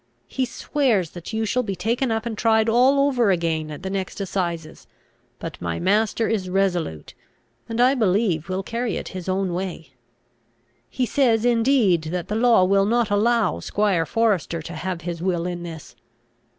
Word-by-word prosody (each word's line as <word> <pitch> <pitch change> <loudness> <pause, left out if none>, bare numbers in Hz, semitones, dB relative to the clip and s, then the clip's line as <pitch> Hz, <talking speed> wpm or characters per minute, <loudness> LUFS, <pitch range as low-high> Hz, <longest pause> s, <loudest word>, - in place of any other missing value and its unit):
He 260 - -1
swears 235 - 0
that 175 +3 -8
you 220 0 -1
shall 250 +4 +1
be 200 -5 -4
taken 230 +8 -1
up 225 0 -1
and 230 -2 -3
tried 220 0 +2
all 255 +5 +4
over 245 -6 +2
again 165 -4 0
at 150 +3 -8
the 190 - -3
next 195 0 -4
assizes; 170 -5 -4 0.5
but - - -8
my 85 -1 -3
master 215 +4 +1
is 195 -5 -1
resolute, 180 - -1 0.6
and 230 +1 -3
I 250 +2 +5
believe 195 - +1
will 185 +1 -2
carry 235 +1 -2
it - - -6
his 185 -1 -6
own 185 -1 0
way. 175 -5 -5 1.0
He 255 - -1
says 240 -4 +2
indeed 230 - +3
that 175 +2 -4
the 210 - -1
law 230 -4 +4
will 195 +1 +3
not 235 -1 +1
allow 215 - +2
squire 190 - 0
Forester 205 -8 0
to 170 - -8
have 175 +2 -4
his 170 -1 -5
will 175 -2 -1
in 175 -1 -4
this. 165 -6 -9
195 Hz, 175 wpm, -23 LUFS, 175-230 Hz, 1.0 s, I